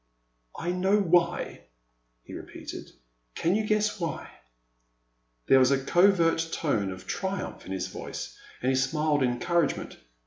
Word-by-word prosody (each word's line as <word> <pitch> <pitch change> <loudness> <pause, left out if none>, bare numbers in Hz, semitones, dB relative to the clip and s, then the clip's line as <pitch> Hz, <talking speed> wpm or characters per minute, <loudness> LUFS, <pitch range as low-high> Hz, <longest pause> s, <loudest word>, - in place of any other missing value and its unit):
I 175 - -2
know 190 +3 +2
why," 175 -2 +1 0.6
he - - -11
repeated; - - -8 0.4
can 170 - +1
you 215 +1 0
guess 210 0 +1
why? 170 -2 -4 0.6
" - - -46
There 135 - +6
was 130 0 +5
a 140 - +3
covert 165 -1 +3
tone 110 -11 0
of 95 - -9
triumph 190 0 -4
in - - -7
his 95 - -2
voice - - -7 0.3
and 130 - +3
he - - +1
smiled 145 +3 +1
encouragement. 135 +6 0
165 Hz, 140 wpm, -27 LUFS, 125-180 Hz, 0.6 s, There